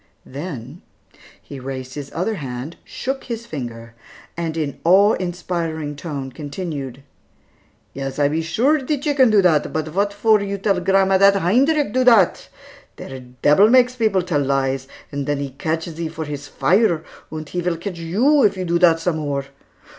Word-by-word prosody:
Then, 140 0 -7 0.6
he 140 - -10
raised 130 0 -6
his 145 -2 -7
other 185 +7 -1
hand, 135 +2 -6
shook 270 +1 -5
his 235 -1 -5
finger, 120 - -7 0.4
and 165 -1 -3
in 150 -3 -3
awe 195 +5 +5
inspiring 170 -4 -3
tone 140 -3 -6
continued: 145 -3 -6 0.9
"Yes, 135 -1 -5
I 145 -1 +3
be 155 +3 -1
sure 240 - +2
die 290 +2 -1
chicken 280 -3 +3
do 210 -3 +4
dat, 165 -5 +3
but 155 -1 -2
vot 200 +5 0
for 210 +1 +3
you 200 0 -3
tell 195 -1 +1
grandma 190 +1 +3
dat 200 0 +6
Heinrick 250 - +2
do 255 - +2
dat? 230 -8 +4 0.5
Der 135 -1 -8 0.2
debil 195 +9 +6
makes 250 0 +4
peoples 215 -6 +1
tell 160 -6 0
lies, 135 -1 0 0.2
and 140 -1 -4
den 145 0 0
he 140 -1 -4
ketch 160 +4 -2
sie 165 -1 -5
for 160 0 -6
his 145 -1 -6
fire, 175 0 +2 0.3
und 155 -1 -6
he 180 - -2
vill 175 -1 -1
ketch 175 0 -6
you, 235 - +3
if 205 -5 +3
you 185 - -3
do 170 0 +1
dat 165 -2 +5
some 165 -1 -1
more. 140 -3 -2
165 Hz, 175 wpm, -21 LUFS, 145-200 Hz, 0.9 s, dat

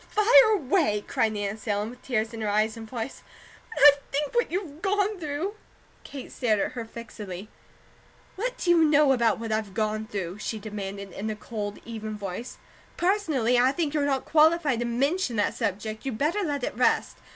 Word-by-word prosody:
"Fire 450 +2 +6
away!" 285 - +1
cried 220 -1 +1
Nancy 210 +1 -4
Ellen, 205 +2 -1
with 250 - -14
tears 225 -2 -1
in 225 - -6
her 215 - -1
eyes 215 +1 +1
and 225 -1 -9
voice. 240 +1 -5 0.5
"When 450 - -1
I 295 - +12 0.2
think 290 +1 -1
what 475 -1 +2
you've 335 -4 -4
gone 405 0 0
through 315 +5 -3 0.3
" - - -32
Kate 275 -3 -9
stared 220 -5 +1
at - - -1
her 235 -2 -5
fixedly. 215 -4 -8 0.9
"What - - -3
do 345 - +1
you 335 -2 +5
know 300 -2 +5
about 235 -4 +3
what 225 0 -5
I've 215 -3 -2
gone 215 0 -1
though?" 190 -2 -4
she 220 +1 -4
demanded 200 -2 -6
in 210 +5 -4
a 215 - -3
cold, 210 -1 -5
even 220 -2 -6
voice. 200 +4 -6 0.4
"Personally, 310 - +2
I 255 +2 +4
think 305 0 -2
you're 295 -2 +1
not 270 -2 0
qualified 310 -4 +3
to 240 - -1
MENTION 270 +4 0
that 205 -1 +1
subject; 215 +3 -3
you 270 - -2
better 300 - 0
let 290 -7 -2
it - - -2
rest. 250 - +1
240 Hz, 195 wpm, -26 LUFS, 215-305 Hz, 0.9 s, I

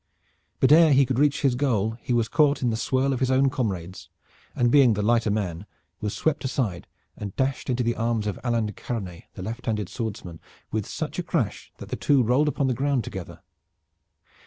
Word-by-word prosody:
But 130 - +4
ere 160 -1 +7
he 135 0 +5
could 130 0 -1
reach 145 0 +2
his 135 -3 +3
goal 115 -5 0
he - - -5
was 120 -2 +2
caught 145 +3 +2
in 120 - +2
the - - -1
swirl 130 +4 0
of 130 - -2
his 130 - +1
own 130 +1 +3
comrades, 95 - -4 0.5
and 120 -1 +2
being 135 -5 +6
the 105 0 -1
lighter 115 0 +2
man 100 -3 -2 0.3
was 105 -1 -3
swept 160 -2 0
aside 115 - -2 0.3
and 100 -2 -7
dashed 135 0 -1
into 125 0 +1
the 120 0 +1
arms 115 -2 -1
of 105 - -3
Alain 120 -3 +1
de 105 - -5
Karanais, 95 -6 -6
the 95 - -7
left 115 +5 -6
handed 105 -4 -1
swordsman, 100 -8 -5 0.3
with 110 -2 -2
such - - -4
a - - -1
crash - - -2
that - - -10
the - - -2
two 140 -3 +3
rolled 125 +6 +2
upon 145 -1 0
the 130 - +1
ground 135 -1 0
together. 95 -2 -8
120 Hz, 205 wpm, -25 LUFS, 105-135 Hz, 0.5 s, ere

